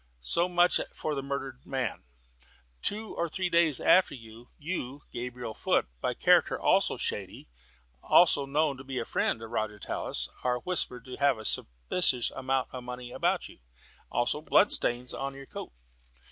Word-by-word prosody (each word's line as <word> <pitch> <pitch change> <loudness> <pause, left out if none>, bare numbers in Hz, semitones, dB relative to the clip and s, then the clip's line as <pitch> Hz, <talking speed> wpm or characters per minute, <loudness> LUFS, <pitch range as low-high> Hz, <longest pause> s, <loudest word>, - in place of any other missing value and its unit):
So 170 - +1
much 175 0 +4 0.2
for 155 - -2
the 140 - -2
murdered 135 -1 -5
man. 130 -5 -2 0.8
Two 215 +1 -3
or 170 0 -1
three 185 +3 -1
days 170 -5 +4
after, 185 -4 +5
you, 125 +5 -7
Gabriel 120 -1 -5
Foot, - - +1
by - - -1
character - - +4
also - - +3
shady, - - -4 0.6
and 175 - +6 0.2
known 150 -1 +2
to 135 - -9
be 135 -1 -5
a 120 - -1
friend 115 - 0
of 115 - -8
Roger 110 -2 -2
Tallis, - - -1 0.2
are 125 -1 +1
whispered 125 -9 -2
to 125 - -8
have 140 -3 +3
a 110 - -8
suspicious 115 - +1
amount 130 0 -1
of 125 -1 -7
money 125 0 -7
about - - 0
you, - - -16 0.5
also 120 +5 0
blood 185 +5 +4
stains 120 +1 -1
on 135 0 -4
your 135 0 -10
coat. - - -8
130 Hz, 160 wpm, -29 LUFS, 120-155 Hz, 0.8 s, and